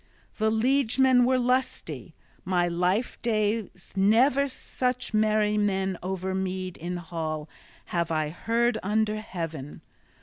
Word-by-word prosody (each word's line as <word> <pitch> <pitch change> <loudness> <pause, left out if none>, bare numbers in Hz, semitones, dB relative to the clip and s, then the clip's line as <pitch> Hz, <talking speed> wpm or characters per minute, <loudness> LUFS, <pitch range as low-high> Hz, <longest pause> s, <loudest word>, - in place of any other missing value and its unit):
The 220 0 +2
liegemen 250 +2 +3
were 260 +1 +3
lusty; 255 +1 -1 0.3
my 175 -1 +1
life 180 +7 0
days 215 -4 -1
never 245 +8 +4
such 250 -2 -3
merry 215 -1 +2
men 190 -2 0
over 190 +1 -3
mead 185 -1 -3
in 175 +2 -4
hall 160 -3 -4 0.5
have 170 -2 +1
I 155 -2 0
heard 230 +8 0
under 215 +2 +1
heaven! 165 -8 -6
210 Hz, 115 wpm, -27 LUFS, 180-235 Hz, 0.5 s, never